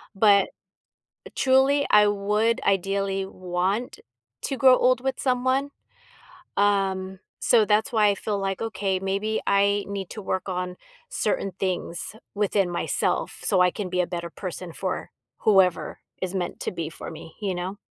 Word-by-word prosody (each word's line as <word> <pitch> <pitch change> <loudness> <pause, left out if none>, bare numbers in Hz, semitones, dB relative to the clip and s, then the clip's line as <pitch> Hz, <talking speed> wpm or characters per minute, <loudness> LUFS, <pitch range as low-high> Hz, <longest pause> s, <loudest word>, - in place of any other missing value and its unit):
but, 200 -1 +5 0.8
eh, - - -9
truly, 270 +2 +3
I 210 0 +7
would 210 +3 +1
ideally 195 0 0
want 185 +5 -2 0.4
to 270 - -2
grow 260 -1 +6
old 250 0 +3
with 265 0 -1
someone, 260 +2 +1 0.9
um, 190 -2 +1 0.2
so, 230 -3 +4
that's 210 +2 +2
why 215 -2 +4
I 200 - +3
feel 205 0 -2
like, 195 -1 -2
"Okay, 200 -4 -1
maybe 195 +3 -1
I 200 0 +3
need 195 -2 -5
to 215 - -7
work 190 0 -2
on 180 -1 -3 0.3
certain 195 - -1
things 185 +1 -3 0.2
within 200 -2 +1
myself 175 - -1
so 190 -3 +2
I 180 0 +5
can 195 +1 -5
be 180 0 0
a 180 - +2
better 170 -1 -5
person 180 -1 -6
for 185 +2 -4 0.3
whoever 190 -4 +3 0.2
is 185 0 -3
meant 180 -2 -3
to - - -3
be 165 -3 -4
for - - -9
me." 160 0 -11
You 195 -3 -1
know? 185 +3 -4
195 Hz, 155 wpm, -25 LUFS, 185-215 Hz, 0.9 s, I